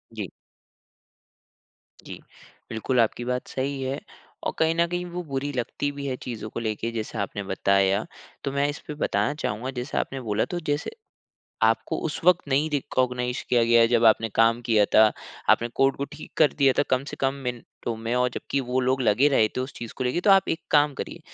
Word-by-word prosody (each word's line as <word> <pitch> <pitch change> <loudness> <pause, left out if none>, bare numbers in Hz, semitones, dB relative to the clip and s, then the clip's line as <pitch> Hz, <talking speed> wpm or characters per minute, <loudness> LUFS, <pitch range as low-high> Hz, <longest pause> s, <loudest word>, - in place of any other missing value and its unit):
जी। - - -4 1.8
जी। - - -8 0.5
बिल्कुल, 115 +3 -1
आपकी 115 +1 +1
बात 125 0 -2
सही 135 +1 -3
है, 130 +1 -2 0.4
और - - -1
कहीं 160 0 +3
न 170 0 +3
कहीं 175 +1 -3
वो 180 0 -5
बुरी 135 +2 -2
लगती 125 +3 -2
भी 140 0 -7
है 130 - -1
चीज़ों 110 -3 -5
को - - -5
लेके, 115 0 -2
जैसा 110 -1 -4
आपने 100 +1 -4
बताया। 100 +1 +2 0.4
तो 140 - -2
मैं 140 +1 +1
इस 145 - -5
पे 150 - -4
बताना 145 - +1
चाहूँगा, 115 +5 -2
जैसे 125 +1 -4
आपने 135 -1 -2
बोला 110 -2 0
तो - - -1
जैसे, 145 +1 -2 0.7
आपको - - +2
उस - - -4
वक़्त 180 -4 +4
नहीं 140 +3 +2
रिकॉग्नाइज 125 -3 -1
किया 120 -1 +4
गया 115 0 +5
जब 115 0 +4
आपने 115 0 +5
काम 115 +1 +4
किया 110 -3 +4
था, 110 0 +7 0.4
आपने 120 - +4
कोड 135 0 +3
को 140 - -2
ठीक 145 - -10
कर 155 -2 +4
दिया 135 -2 +5
था - - +6
कम 130 +1 +2
से - - -7
कम 135 0 +1
मिनटों 120 -1 -5
में, 115 +2 -3
और 125 0 +2
जबकि 140 - -2
वो 130 0 -1
लोग 130 +1 +1
लगे 120 +5 +4
रहे 110 -6 +3
थे - - 0
उस 130 +2 -4
चीज़ 115 -1 -7
को 130 - -2
लेके। 125 +8 0
तो 200 - +3
आप 195 -2 +5
एक 165 - -1
काम 145 -1 +4
करिए, - - -6
125 Hz, 205 wpm, -25 LUFS, 115-140 Hz, 1.8 s, था